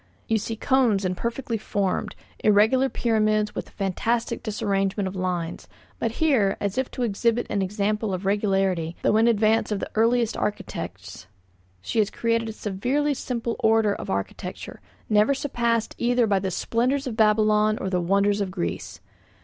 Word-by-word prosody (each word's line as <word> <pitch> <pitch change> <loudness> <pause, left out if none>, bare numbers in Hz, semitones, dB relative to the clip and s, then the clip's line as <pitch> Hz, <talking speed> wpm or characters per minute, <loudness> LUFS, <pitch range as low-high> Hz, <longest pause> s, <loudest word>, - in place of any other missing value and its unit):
You 220 -1 +2
see 225 +2 -4
cones 230 -5 +2
imperfectly 230 +5 -2
formed, 200 -3 -2 0.2
irregular 220 +6 +4
pyramids, 215 -3 +1
with - - -5
a - - -25
fantastic 230 +5 -1
disarrangement 200 -2 -1
of 190 - -6
lines; 180 -2 -3 0.3
but 230 - -1
here, 240 -10 +2
as 200 +4 -1
if 260 - -1
to 250 - -4
exhibit 230 +2 +1
an 200 - 0
example 210 +2 -1
of 185 +1 -4
regularity, 195 -4 +1
though - - +3
in 225 +1 +4
advance 220 -1 +2
of 205 - 0
the - - -5
very 220 +1 +4
earliest 235 -1 +1
architects, 210 - -5 0.6
she 225 - -1
has 210 -1 +3
created 230 0 -1
a - - -5
severely 250 +9 -1
simple 235 -3 -3
order 220 -2 +3
of - - -7
architecture, 95 0 -5 0.3
never 215 +6 +3
surpassed 235 -5 -1
either 245 0 +2
by 200 -3 +2
the 190 0 -2
splendours 255 +8 0
of 250 -4 -4
Babylon 215 -1 +3
or - - -3
the 180 -1 0
wonders 200 +3 +2
of 195 - -1
Greece. 170 - -4
215 Hz, 165 wpm, -24 LUFS, 195-230 Hz, 0.6 s, irregular